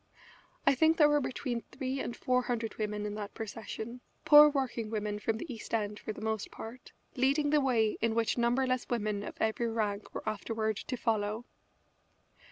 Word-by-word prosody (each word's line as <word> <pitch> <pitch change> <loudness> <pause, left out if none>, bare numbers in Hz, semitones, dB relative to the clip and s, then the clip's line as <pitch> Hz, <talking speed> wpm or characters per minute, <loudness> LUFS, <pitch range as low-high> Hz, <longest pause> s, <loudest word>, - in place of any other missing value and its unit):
I - - +6
think 320 +4 +4
there 300 -3 +7
were 295 0 +3
between 250 -2 -3
three 265 +1 -4
and 240 - -3
four 250 0 +2
hundred 235 -3 -2
women 210 -1 -2
in 205 - -3
that 210 -1 -6
procession, 225 +2 -6 0.2
poor 300 0 +10
working 260 -6 -2
women 210 -1 -2
from 220 +1 -1
the 265 +2 -6
East 230 0 -4
End, 210 -1 -2
for - - -5
the 215 - -8
most 220 -1 -2
part, 235 +3 -9 0.2
leading 280 +3 +2
the 300 -1 +4
way 230 -5 +2
in 225 0 +1
which 230 -2 +1
numberless 255 +1 +1
women 215 -4 -1
of - - -7
every 220 +2 +1
rank 215 -2 -2
were - - -5
afterward 220 0 -1
to 255 - -4
follow. 220 0 -1
230 Hz, 180 wpm, -31 LUFS, 215-255 Hz, 0.2 s, poor